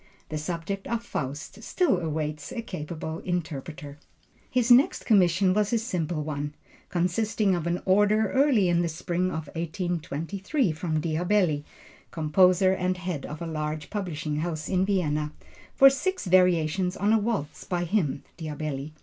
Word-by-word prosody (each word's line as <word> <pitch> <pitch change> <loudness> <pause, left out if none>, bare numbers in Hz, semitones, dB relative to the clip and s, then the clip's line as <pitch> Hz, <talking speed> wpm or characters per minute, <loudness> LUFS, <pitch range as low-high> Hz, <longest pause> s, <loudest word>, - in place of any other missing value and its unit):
The 155 - -3
subject 175 +5 -4
of 235 -1 -2
Faust 155 - -5
still 325 - +1
awaits 155 -3 -3
a 230 - -4
capable 160 -4 -5
interpreter. 150 -4 -5 0.5
His 250 -1 +2
next 250 +3 +5
commission 185 -3 +4
was 210 +1 +1
a 235 - +3
simple 175 -9 -2
one, 145 -1 -4 0.3
consisting 195 +3 +1
of 170 -2 -1
an 175 +1 -1
order 205 +2 +3
early 265 -8 +4
in 175 0 +3
the 170 - 0
spring 175 +2 -1
of 160 -4 -3
1823 175 - -2
from 155 0 -2
Diabelli, 165 -1 +1 0.4
composer 180 +4 +4
and 185 0 -1
head 180 -5 -4
of 150 +3 -6
a - - -3
large 155 -1 -4
publishing 160 -7 -3
house 155 -1 -3
in 185 0 +1
Vienna, 150 -6 0 0.4
for 275 - +8
six 320 - +1
variations 180 -1 +3
on 205 +3 +2
a 225 - +5
waltz 205 -9 -2
by 175 -2 -2
him 170 -7 0 0.2
(Diabelli). 150 -2 -4
175 Hz, 150 wpm, -27 LUFS, 155-195 Hz, 0.5 s, for